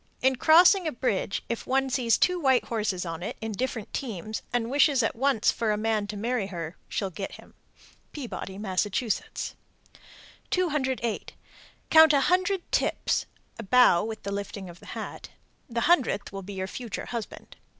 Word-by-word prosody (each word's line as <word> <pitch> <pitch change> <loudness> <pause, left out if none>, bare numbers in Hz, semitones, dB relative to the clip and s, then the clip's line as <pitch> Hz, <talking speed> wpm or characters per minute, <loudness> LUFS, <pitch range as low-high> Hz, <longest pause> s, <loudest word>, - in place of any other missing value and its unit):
In 265 0 +3
crossing 345 +5 +6
a - - 0
bridge, 210 -6 -1
if 235 - -4
one 270 +1 +2
sees 240 -3 +2
two 360 -1 +2
white 265 -5 +3
horses 210 -5 -2
on 165 0 -5
it 190 - -5
(in 225 0 -4
different 225 0 -4
teams) 215 -4 -4
and 240 -1 -1
wishes 280 -2 +4
at 225 - 0
once 265 -2 +2
for 225 -2 -1
a 210 - 0
man 215 -1 0
to 205 0 -5
marry 230 -1 -1
her, 170 -2 -6
she'll 195 -2 -2
get 195 +2 -6
him. - - -14 0.6
Peabody, 235 -8 -6
Mass. 195 -1 0
208. 260 - -4 0.6
Count 320 -1 +8
a 280 - +5
hundred 370 +2 +1
"tips" - - 0 0.3
(a - - -4
bow 225 -5 +5
with 220 0 -6
the 200 - -4
lifting 200 -2 -5
of 170 - -16
the - - -15
hat). - - -7 0.4
The 235 0 -1
hundredth 260 - +2
will 195 - -5
be 200 +2 -8
your 190 -1 -3
future 230 +2 -6
husband. 235 -3 -7
230 Hz, 170 wpm, -27 LUFS, 200-265 Hz, 0.6 s, Count